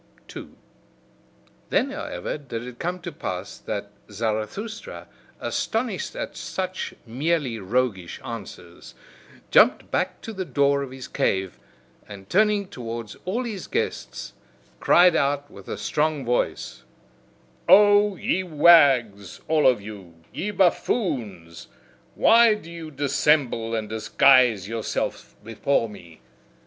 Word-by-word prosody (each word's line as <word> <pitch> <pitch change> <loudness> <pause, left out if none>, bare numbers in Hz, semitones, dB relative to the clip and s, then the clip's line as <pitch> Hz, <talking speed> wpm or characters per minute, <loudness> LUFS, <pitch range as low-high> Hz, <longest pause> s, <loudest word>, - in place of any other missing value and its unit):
2. - - -10 1.1
Then, 270 - +1
however, 295 +3 -5
did 120 -5 -6
it 125 -1 -10
come 180 +2 -3
to 175 - -6
pass 95 - -6
that 100 -1 -5 0.2
Zarathustra, 115 - -4 0.3
astonished 225 +1 -2
at - - -5
such 185 0 -4
merely 130 0 -1
roguish 100 -3 -2
answers, 95 -6 -9 0.6
jumped - - +4
back - - -1
to 225 - -7
the 190 -2 -3
door 140 -4 +1
of 140 - -5
his 130 0 -9
cave, 95 -9 -1 0.5
and 100 -2 -11
turning 210 0 +2
towards 115 - -7
all 215 +8 -1
his 215 -6 -6
guests, 460 0 -4 0.5
cried 175 -1 +5
out 145 -1 0
with - - -13
a - - -4
strong 150 -3 -1
voice: 120 - -2 0.9
"O 205 0 +6
ye 185 - -1
wags, 145 - +4
all 155 -2 +3
of 125 -5 +3
you, 100 -5 -10 0.2
ye 205 - -3
buffoons! 125 - -1 0.5
Why 230 -1 +6
do 170 -5 -11
ye 165 -2 -8
dissemble 140 -5 +1
and 110 -1 -3
disguise 110 -1 +4
yourselves 115 0 -4
before 115 +2 0
me! 85 -8 -14
140 Hz, 120 wpm, -24 LUFS, 110-180 Hz, 1.1 s, O